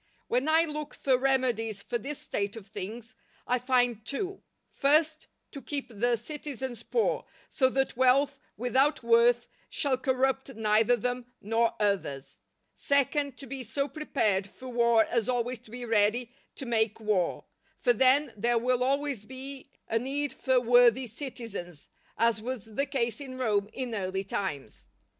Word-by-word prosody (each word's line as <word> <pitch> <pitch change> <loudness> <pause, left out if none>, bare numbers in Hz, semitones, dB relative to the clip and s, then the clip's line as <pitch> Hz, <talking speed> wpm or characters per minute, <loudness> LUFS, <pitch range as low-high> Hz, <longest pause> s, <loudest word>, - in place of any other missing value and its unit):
When 250 +4 0
I 320 +1 +5
look 300 -1 -5
for 265 -2 +2
remedies 250 -6 0
for 240 - -2
this 280 +5 -5
state 200 +1 -3
of 220 -4 -9
things, 215 +3 -7 0.3
I 250 0 +1
find 245 -3 +1
two: 375 - -4 0.3
first, 310 +2 +2 0.2
to 280 - -8
keep 280 -2 -4
the 235 +2 +1
citizens 260 -1 -6
poor, 460 - 0 0.3
so 260 -3 +3
that 270 +1 0
wealth 270 +2 +3 0.2
without 260 +5 +2
worth 235 +1 +4 0.2
shall 270 -4 0
corrupt 265 0 0
neither 220 +2 +3
them 245 +2 -3
nor 225 +2 +1
others; 195 -10 -1 0.4
second, 280 -1 +1
to 275 - -9
be 270 +1 -6
so 275 +4 -2
prepared 215 -11 0
for 255 +5 -10
war 235 -2 +4
as 235 0 -1
always 245 0 -1
to 230 - -18
be 245 +2 -6
ready 225 +2 +2 0.2
to 270 - -7
make 220 -3 +1
war; 210 -5 0 0.3
for 245 - +3
then 260 +3 +4
there 235 +3 +1
will 250 +1 +1
always 275 -3 0
be 265 +2 -7 0.2
a 225 - +1
need 280 +4 -2
for 260 -1 +2
worthy 245 +1 +5
citizens, 230 - -7 0.3
as 230 -1 +2
was 225 -2 -6
the 275 +6 0
case 235 -1 -1
in 260 -2 -7
Rome 210 -5 0
in 255 -2 -4
early 190 -2 -2
times. 150 - -5
245 Hz, 155 wpm, -29 LUFS, 225-270 Hz, 0.4 s, I